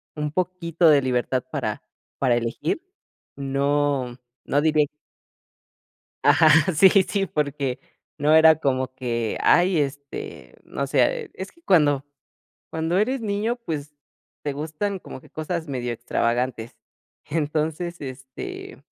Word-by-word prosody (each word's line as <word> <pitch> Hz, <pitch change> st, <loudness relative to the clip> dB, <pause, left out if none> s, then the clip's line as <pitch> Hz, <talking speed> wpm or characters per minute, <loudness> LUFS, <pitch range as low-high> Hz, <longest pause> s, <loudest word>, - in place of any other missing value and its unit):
un 150 Hz, -1 st, -3 dB
poquito 170 Hz, -2 st, +1 dB
de 145 Hz, -2 st, +6 dB
libertad 125 Hz, 0 st, 0 dB
para -, -, -3 dB, 0.4 s
para 130 Hz, -3 st, +3 dB
elegir. 120 Hz, -, -2 dB, 0.5 s
No 140 Hz, -2 st, 0 dB, 0.3 s
no 145 Hz, -, +2 dB
diré 155 Hz, -1 st, +3 dB, 1.4 s
Ajá, 160 Hz, -1 st, +6 dB, 0.3 s
sí, 190 Hz, +6 st, +8 dB, 0.2 s
sí, 195 Hz, +1 st, -1 dB
porque 140 Hz, -5 st, -2 dB, 0.4 s
no 150 Hz, +2 st, +4 dB
era 160 Hz, 0 st, +8 dB
como 130 Hz, -3 st, -1 dB
que, 120 Hz, -3 st, -2 dB
ay, 175 Hz, -2 st, +4 dB
este, 140 Hz, 0 st, -5 dB
no -, -, -3 dB
sé. 475 Hz, -4 st, +1 dB
Es 190 Hz, -, -7 dB
que 335 Hz, -, -27 dB
cuando 145 Hz, -, +3 dB, 0.6 s
cuando 160 Hz, +2 st, -1 dB
eres 245 Hz, +6 st, +1 dB
niño, 215 Hz, +2 st, -1 dB
pues, 150 Hz, -, -6 dB, 0.5 s
te 145 Hz, -, -1 dB
gustan 160 Hz, +7 st, -3 dB
como 130 Hz, -, -10 dB
que -, -, -18 dB
cosas 160 Hz, +1 st, -4 dB
medio 125 Hz, -3 st, -3 dB
extravagantes. 120 Hz, 0 st, -1 dB, 0.5 s
Entonces, 160 Hz, +2 st, -2 dB
este, 130 Hz, -1 st, -8 dB
150 Hz, 120 wpm, -24 LUFS, 130-170 Hz, 1.4 s, sí